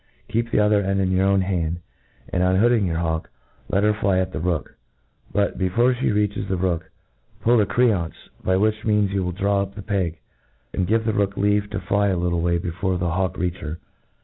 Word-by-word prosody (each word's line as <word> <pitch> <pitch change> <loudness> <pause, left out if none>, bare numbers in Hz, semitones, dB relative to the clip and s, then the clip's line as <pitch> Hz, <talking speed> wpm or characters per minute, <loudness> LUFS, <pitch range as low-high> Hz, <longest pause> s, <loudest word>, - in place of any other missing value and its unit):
Keep 115 +1 0
the - - 0
other 105 0 +4
end 100 0 0
in 95 -1 +1
your 95 +1 +3
own 100 -1 +3
hand, 85 -3 -1 0.5
and, 90 - 0
unhoodmg 100 +3 +3
your 80 -2 -1
hawk, 80 -1 -2 0.4
let 100 - +2
her 105 0 +4
fly 100 -3 +1
at 95 0 0
the 70 - -4
rook* 85 -3 -2 0.6
But, 100 0 0
before 115 +7 +3
flie 125 - -1
reaches 105 -1 0
the 95 - -1
rook, 85 -2 -1 0.5
pull 120 +1 +4
the 105 - +2
creance, 105 -10 +1 0.3
by 95 0 +2
which 110 +2 +1
means 105 -2 +2
you 100 -1 0
will 90 - -2
draw 100 +2 +1
up 100 0 -5
the 105 - -7
pcg^ 95 -6 -1 0.6
and 90 - 0
give 110 +2 +1
the 110 - +1
rook 100 -2 0
leave 105 +1 +1
to - - -3
fly 100 0 +1
a 95 -2 +1
little 85 -1 0
way 85 0 +2
before 90 +2 -2
the 90 -1 -1
hawk 95 0 -1
reach 90 0 -1
her. 80 +1 -6
95 Hz, 215 wpm, -23 LUFS, 90-105 Hz, 0.6 s, other